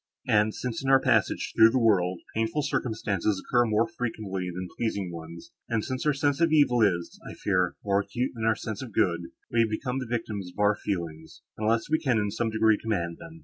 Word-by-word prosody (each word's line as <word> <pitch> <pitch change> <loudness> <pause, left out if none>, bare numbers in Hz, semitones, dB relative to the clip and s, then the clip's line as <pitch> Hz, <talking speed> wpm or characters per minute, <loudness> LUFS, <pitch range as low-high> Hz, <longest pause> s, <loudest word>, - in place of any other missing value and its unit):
And, 105 0 +2
since, 125 -1 -4
in 135 - -1
our 135 0 +7
passage 120 -6 +1
through 110 - +8
this 115 - 0
world, 95 -7 +2
painful 115 +7 0
circumstances 105 -6 -1
occur 120 +4 +2
more 110 +1 +2
frequently 110 -6 -4
than 90 +1 -5
pleasing 100 -6 -2
ones, 85 0 -9 0.2
and 115 -2 0
since 130 +3 -3
our - - +5
sense 145 +2 0
of 165 -1 +4
evil 145 -6 +4
is, 85 -5 +1
I - - -8
fear, 90 -3 0
more 100 -1 +2
acute 120 +5 -2
than 115 -2 -4
our 110 0 +3
sense 105 0 -5
of 120 -5 -8
good, 85 -2 +1 0.3
we 115 -1 +4
become 125 +4 -2
the 130 - -5
victims 110 -5 -3
of - - -16
our 105 0 +4
feelings, 85 -6 -5
unless 110 +1 0
we 155 +1 +1
can 130 -6 +1
in 105 -2 0
some 115 +2 -1
degree 110 -1 +3
command 85 -7 -2
them. 165 -1 -11
110 Hz, 210 wpm, -27 LUFS, 95-120 Hz, 0.3 s, through